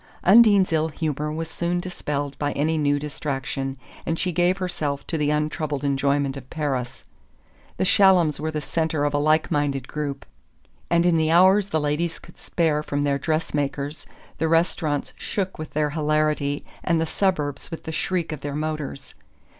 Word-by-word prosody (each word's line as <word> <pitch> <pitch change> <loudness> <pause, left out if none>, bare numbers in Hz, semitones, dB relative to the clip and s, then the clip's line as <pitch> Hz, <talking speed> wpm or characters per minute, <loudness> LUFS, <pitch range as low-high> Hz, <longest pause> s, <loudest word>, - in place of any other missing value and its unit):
Undine's 200 -3 +6
ill 160 0 +2
humour 150 -1 -2
was 160 +1 -3
soon 175 +2 -2
dispelled 145 -6 -3
by 145 -1 0
any 155 +3 +1
new 145 -2 +2
distraction, 135 -2 -4 0.3
and 165 - -1
she 180 - 0
gave 175 +2 +2
herself 155 -7 -3
to - - -4
the 150 -2 +1
untroubled 150 -1 -1
enjoyment 140 0 +1
of 135 -2 -9
Paris. 135 -5 -3 0.7
The - - +1
Shallums 185 -7 +4
were 155 +1 -2
the 155 -1 -3
centre 160 0 -1
of 145 - 0
a 145 - +2
like 155 +2 +2
minded 140 -3 0
group, 145 -2 -4 0.6
and 170 0 +3
in 175 -2 +4
the 160 0 +2
hours 190 +4 +5
the 160 - +1
ladies 150 +3 -1
could - - -16
spare 160 -3 0
from 145 -1 -2
their 140 -1 +1
dress 155 +2 -1
makers 145 +1 -3 0.3
the 160 - +1
restaurants 165 -2 +1
shook 190 -4 -3
with 155 -2 -7
their 150 -1 +1
hilarity 150 -1 0 0.2
and 170 -2 +2
the 165 - +1
suburbs 155 -6 -1
with 165 - -7
the 160 - -5
shriek 170 0 -1
of 155 -3 -5
their 145 0 -4
motors. 150 -2 -4
155 Hz, 175 wpm, -24 LUFS, 145-165 Hz, 0.7 s, Undine's